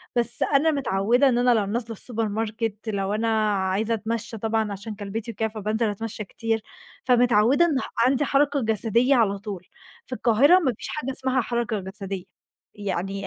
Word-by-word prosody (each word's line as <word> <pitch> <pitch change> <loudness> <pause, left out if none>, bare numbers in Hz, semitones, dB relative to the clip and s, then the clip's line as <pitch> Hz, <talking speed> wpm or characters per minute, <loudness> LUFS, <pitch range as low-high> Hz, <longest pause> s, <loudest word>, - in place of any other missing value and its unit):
بس 240 0 0
أنا 300 +3 +3
متعودة 245 0 +2
إن 240 - +1
أنا 245 0 +4
لو 215 -3 +2
نازلة 225 +2 -3
الSupermarket 225 0 -2 0.2
لو 200 -1 -1
أنا 220 +2 0 0.3
عايزة 195 +4 0
أتمشى 225 +1 -3
طبعًا 220 -1 -1
عشان 210 +2 -6
كلبتي 215 +3 -5
وكده 220 +1 -1
فبانزل 215 +1 -1
أتمشى 215 +1 -5
كتير، 225 +2 -2 0.4
فمتعودة 245 +4 +4
إن 310 -5 +1 0.3
عندي 270 +2 +2
حركة 280 0 +2
جسدية 225 +4 +2
على 205 -5 +2
طول. 195 -3 -7 0.4
في 255 - -5
القاهرة 265 +11 +5
ما 265 -8 0
فيش - - -6
حاجة 270 -3 -3
اسمها 260 0 0
حركة 235 -3 -2
جسدية، 195 -1 -6 0.5
يعني 195 -1 -3
225 Hz, 160 wpm, -24 LUFS, 205-245 Hz, 0.5 s, القاهرة